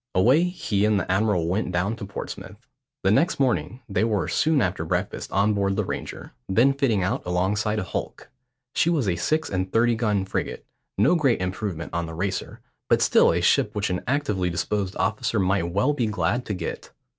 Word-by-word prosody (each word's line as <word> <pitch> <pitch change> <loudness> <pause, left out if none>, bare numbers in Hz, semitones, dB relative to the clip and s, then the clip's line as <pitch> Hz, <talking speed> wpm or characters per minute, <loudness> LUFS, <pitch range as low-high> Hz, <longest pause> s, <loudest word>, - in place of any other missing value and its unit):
Away 130 - +4
he 160 - -1
and 105 -1 +3
the 95 - -3
admiral 95 -4 +1
went 95 +2 -1
down 90 +5 0
to 100 - -7
Portsmouth. 100 - -8 0.4
The 95 - +3
next 165 - +2
morning 130 -1 0
they 105 +1 0
were, 105 -4 0
soon 155 -2 +2
after 90 -6 0
breakfast, - - -3
on 100 +2 +2
board 100 -1 0
the - - 0
Ranger, - - -6 0.2
then 120 +8 +4
fitting 125 -9 +1
out 115 +9 -1
alongside 100 +5 0
a 105 - -1
hulk. 95 - -6 0.4
She 170 - +2
was 150 -10 +1
a 90 - +1
six 155 - 0
and 95 0 -2
thirty 120 +1 +3
gun 105 -4 0
frigate, - - -4 0.3
no 105 - +4
great 140 -8 +2
improvement 90 -2 -4
on 85 0 -2
the 80 - -7
Racer, 95 +2 -3 0.3
but - - +4
still - - +5
a - - 0
ship - - +2
which 105 -2 -1
an 90 - -1
actively 105 -9 0
disposed 95 +2 -2
officer - - 0
might 95 -2 +1
well 105 +11 +2
be 125 -6 0
glad 120 +3 -1
to 105 - -2
get. - - -5
105 Hz, 195 wpm, -24 LUFS, 95-120 Hz, 0.4 s, still